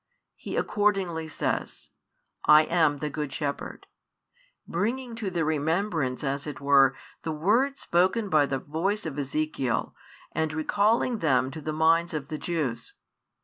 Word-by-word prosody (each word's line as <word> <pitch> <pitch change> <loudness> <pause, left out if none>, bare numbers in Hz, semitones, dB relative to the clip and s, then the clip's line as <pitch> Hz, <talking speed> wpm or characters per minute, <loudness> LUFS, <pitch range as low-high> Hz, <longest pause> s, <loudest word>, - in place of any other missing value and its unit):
He - - -6
accordingly 195 -6 0
says: 155 - -3 0.5
I 150 +1 +8
am 155 -3 +2
the 150 +1 -3
Good 150 -1 -4
Shepherd, 145 -1 -4 0.8
bringing 235 +7 -2
to 215 -4 -2
their 170 -3 -1
remembrance 160 -3 0
as 140 +1 -2
it 145 - -6
were 140 -1 +5 0.3
the 160 - -3
words 225 - +1
spoken 185 +6 +2
by 155 -6 +3
the 135 - -1
voice 170 +10 -2
of 150 -2 -4
Ezekiel 140 -3 -1 0.4
and 160 0 -1
recalling 215 +9 +1
them 130 -5 +2
to 155 - -7
the 155 - -3
minds 165 +2 +2
of 145 -2 -4
the 155 - -4
Jews. 140 -9 -3
160 Hz, 145 wpm, -27 LUFS, 145-185 Hz, 0.8 s, I